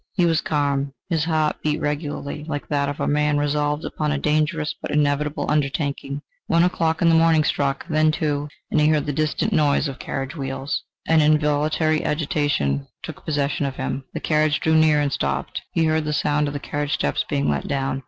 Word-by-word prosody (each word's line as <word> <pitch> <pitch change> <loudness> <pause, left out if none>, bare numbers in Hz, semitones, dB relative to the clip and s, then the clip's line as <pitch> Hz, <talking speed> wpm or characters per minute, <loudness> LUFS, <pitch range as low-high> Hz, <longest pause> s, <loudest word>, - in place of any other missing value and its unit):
He 180 - +2
was 165 -1 +2
calm; 140 -2 0 0.2
his 160 -2 +1
heart 155 -2 +1
beat 150 0 0
regularly, 145 -1 -3
like 145 -2 -4
that 140 -1 +1
of 145 - -5
a - - 0
man 150 0 +2
resolved 145 +1 0
upon 150 -1 -2
a 150 - 0
dangerous 155 +1 0
but - - -5
inevitable 150 0 0
undertaking. 140 -1 -1 0.2
One 165 +1 +4
o'clock 165 -2 +1
in 165 - +5
the - - +4
morning 165 -1 +5
struck; 140 +1 -1
then 155 -2 +3
two; 150 -2 -1 0.2
and 155 - +3
he 150 - +4
heard 155 -2 +2
the 145 - -2
distant 155 +1 0
noise 145 0 +3
of 135 -2 -7
carriage 135 +2 -4
wheels. 135 -1 -3 0.3
An 160 -1 +5
involuntary 155 +1 +2
agitation 145 - 0 0.2
took - - -8
possession 145 -1 0
of 135 - -5
him. 135 - -3
The - - -1
carriage 155 -1 +2
drew 160 - +1
near 155 -1 +5
and 145 -2 0
stopped. 70 0 -2
He 165 - +2
heard 155 0 +1
the 150 - -1
sound 150 0 +1
of 145 - -4
the - - -2
carriage 145 +1 -2
steps 70 - 0
being 70 +1 0
let 70 -1 -1
down. 135 -1 -1
150 Hz, 200 wpm, -22 LUFS, 140-155 Hz, 0.3 s, in